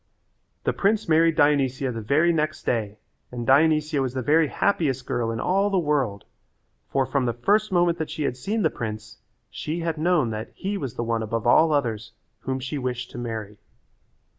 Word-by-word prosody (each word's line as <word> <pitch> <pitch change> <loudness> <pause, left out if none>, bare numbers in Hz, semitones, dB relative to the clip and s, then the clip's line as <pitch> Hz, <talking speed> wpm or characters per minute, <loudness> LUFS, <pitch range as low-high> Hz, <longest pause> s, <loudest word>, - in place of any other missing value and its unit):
The - - 0
prince 210 +2 +1
married 165 0 +4
Dionysia 140 -3 +2
the 115 -1 -5
very 155 +10 +3
next 155 -1 -1
day 110 -3 -1 0.3
and 120 -1 -5
Dionysia 150 +2 +3
was 130 -1 -2
the 130 - -2
very 155 +4 +4
happiest 140 -8 0
girl 115 -2 -1
in 115 0 -3
all 195 - +1
the 195 - +1
world, 140 - 0 0.6
for 135 -1 +1
from 130 0 0
the 120 - 0
first 210 - +2
moment 175 -2 +2
that 160 - -3
she 155 - -4
had 130 - -1
seen 205 - -2
the 160 - +2
prince, 110 -1 -6 0.3
she 165 +3 -4
had 165 -2 -2
known 155 -7 +2
that 110 0 -5
he 195 +2 -3
was 135 - -5
the - - -2
one 115 -1 -1
above 110 0 -3
all 155 +7 +5
others 115 -6 -1 0.3
whom 130 0 -3
she 130 +3 -4
wished 125 -1 -4
to - - -7
marry. 110 -3 -5
140 Hz, 190 wpm, -24 LUFS, 120-165 Hz, 0.6 s, all